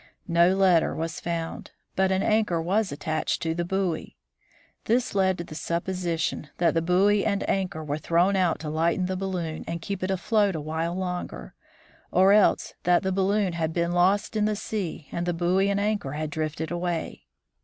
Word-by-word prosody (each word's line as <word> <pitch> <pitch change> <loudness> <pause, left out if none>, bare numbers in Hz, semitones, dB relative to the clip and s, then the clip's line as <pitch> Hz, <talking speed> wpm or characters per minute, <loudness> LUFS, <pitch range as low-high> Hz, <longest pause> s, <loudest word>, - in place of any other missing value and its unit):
No 170 +1 +4
letter 185 -4 +3
was 165 +1 -3
found, 165 -1 -4 0.3
but 190 0 +2
an 190 0 +1
anchor 215 -6 +2
was 190 +6 0
attached 155 +2 -2
to 165 -1 0
the 175 +1 -2
buoy. 180 -2 -2 0.7
This 245 +3 +1
led 190 -2 +2
to 170 - -4
the 160 - -10
supposition 170 -2 -2
that 170 -2 +3
the 165 - +1
buoy 195 +4 +3
and 200 -2 0
anchor 185 -5 -1
were 150 0 -3
thrown 170 +5 +2
out 180 -4 +2
to 155 - -4
lighten 170 +4 +1
the 185 +1 -2
balloon 180 -4 -3
and 170 0 -3
keep 195 +2 -5
it 185 - -2
afloat 200 +1 +1
a - - -2
while 160 +3 -2
longer, 180 - -4 0.6
or 190 +2 +5
else 210 -1 +3
that 175 0 +3
the 190 - 0
balloon 195 0 +1
had 160 -1 -2
been 170 0 0
lost 190 +5 +2
in 210 -1 +2
the 215 0 +1
sea 190 -8 -4
and 170 +1 -3
the 175 - 0
buoy 180 +3 +2
and 200 0 +1
anchor 205 -9 -1
had 155 0 -3
drifted 160 0 -3
away. 175 -1 -3
175 Hz, 185 wpm, -26 LUFS, 165-195 Hz, 0.7 s, or